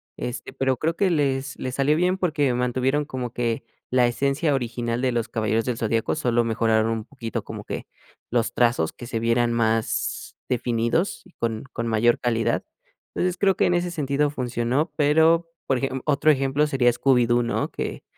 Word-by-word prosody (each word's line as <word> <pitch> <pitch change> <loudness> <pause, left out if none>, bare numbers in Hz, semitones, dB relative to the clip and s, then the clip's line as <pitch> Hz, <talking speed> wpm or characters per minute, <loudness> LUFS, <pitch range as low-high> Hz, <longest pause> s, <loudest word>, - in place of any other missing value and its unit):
este, 125 0 -5
pero, 130 -1 0
creo 165 +4 -1
que 195 0 +2
les 140 -3 0
les 130 0 -4
salió 145 +3 +2
bien 180 +2 +2
porque, 150 -8 +1
mantuvieron 125 +4 0
como 130 -4 -5
que 115 -2 -1 0.3
la 125 -1 +4
esencia 140 +5 0
original 120 -1 -2
de 130 -1 +1
Los 115 -1 -1
Caballeros 110 0 0
Del 125 -2 -2
Zodiaco, 115 0 0
solo 120 -5 +1
mejoraron 110 -1 +2
un 115 -1 -2
poquito 115 -5 -5
como - - -8
que - - -5 0.5
los 115 -1 +1
trazos 120 -10 +2
que 120 - -10
se 115 -1 -3
vieran 115 +1 +2
más 115 -1 -1
definidos 120 - 0
y - - -19
con 115 -2 -3
con 115 0 -3
mayor 115 +1 +3
calidad. 115 -2 0 0.5
Entonces 180 0 -1
creo 195 -1 +3
que - - +3
en 175 - +2
ese 175 0 0
sentido 145 -2 0
funcionó, 125 +3 -1
pero, 160 +3 +3 0.2
por 135 - +2
ejem 135 0 -2
otro 150 +1 +4
ejemplo 135 +1 +1
sería 135 -4 +3
Scooby-Doo, 120 -2 +3
¿no?, 120 - -1
que - - -5
125 Hz, 180 wpm, -24 LUFS, 115-145 Hz, 0.5 s, la